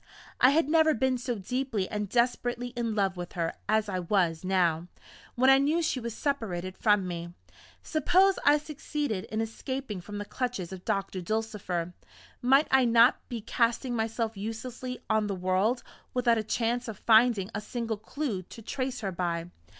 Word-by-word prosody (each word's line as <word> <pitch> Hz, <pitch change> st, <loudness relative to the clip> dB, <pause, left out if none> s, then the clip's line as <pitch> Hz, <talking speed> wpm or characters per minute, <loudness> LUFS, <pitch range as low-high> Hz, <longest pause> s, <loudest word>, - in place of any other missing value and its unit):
I 255 Hz, -, +7 dB
had 310 Hz, +2 st, +3 dB
never 315 Hz, 0 st, +4 dB
been 255 Hz, +2 st, +1 dB
so 245 Hz, 0 st, -2 dB
deeply 225 Hz, 0 st, -2 dB
and 210 Hz, -2 st, -3 dB
desperately 245 Hz, +1 st, 0 dB
in 235 Hz, -3 st, -3 dB
love 195 Hz, -3 st, +1 dB
with 175 Hz, 0 st, -6 dB
her 165 Hz, -2 st, -1 dB, 0.2 s
as 215 Hz, 0 st, +2 dB
I 185 Hz, -2 st, -2 dB
was 175 Hz, -3 st, +1 dB
now, 175 Hz, -3 st, +1 dB, 0.5 s
when 260 Hz, +2 st, +5 dB
I 270 Hz, -, +7 dB
knew 310 Hz, +5 st, +2 dB
she 310 Hz, -5 st, 0 dB
was 235 Hz, -2 st, -5 dB
separated 190 Hz, -10 st, -2 dB
from 205 Hz, -3 st, +2 dB
me. 170 Hz, 0 st, -6 dB, 0.5 s
Suppose 370 Hz, +5 st, +3 dB
I 290 Hz, +1 st, +6 dB
succeeded 290 Hz, -7 st, -3 dB
in 220 Hz, +1 st, -2 dB
escaping 225 Hz, -2 st, -4 dB
from 205 Hz, +3 st, -7 dB
the 205 Hz, -, -4 dB
clutches 240 Hz, -8 st, -3 dB
of 185 Hz, -1 st, -9 dB
Doctor 195 Hz, -1 st, -1 dB
Dulcifer 185 Hz, -4 st, -2 dB, 0.5 s
might 270 Hz, +5 st, +4 dB
I 265 Hz, -1 st, +6 dB
not 235 Hz, +1 st, +5 dB
be 235 Hz, -2 st, -4 dB
casting 235 Hz, +2 st, 0 dB
myself 225 Hz, 0 st, -1 dB
uselessly 240 Hz, +5 st, -5 dB
on 220 Hz, -1 st, +2 dB
the 200 Hz, -, -2 dB
world, 185 Hz, +7 st, +1 dB, 0.3 s
without 240 Hz, -2 st, +3 dB
a -, -, -2 dB
chance 235 Hz, +3 st, -1 dB
of 220 Hz, -3 st, -6 dB
finding 220 Hz, -3 st, +4 dB
a 215 Hz, -, -3 dB
single 230 Hz, 0 st, -3 dB
clew 225 Hz, -2 st, -3 dB
to 205 Hz, +5 st, -12 dB
trace 260 Hz, +1 st, -3 dB
her 195 Hz, -3 st, -2 dB
by? 170 Hz, -1 st, -2 dB
225 Hz, 175 wpm, -28 LUFS, 190-255 Hz, 0.5 s, I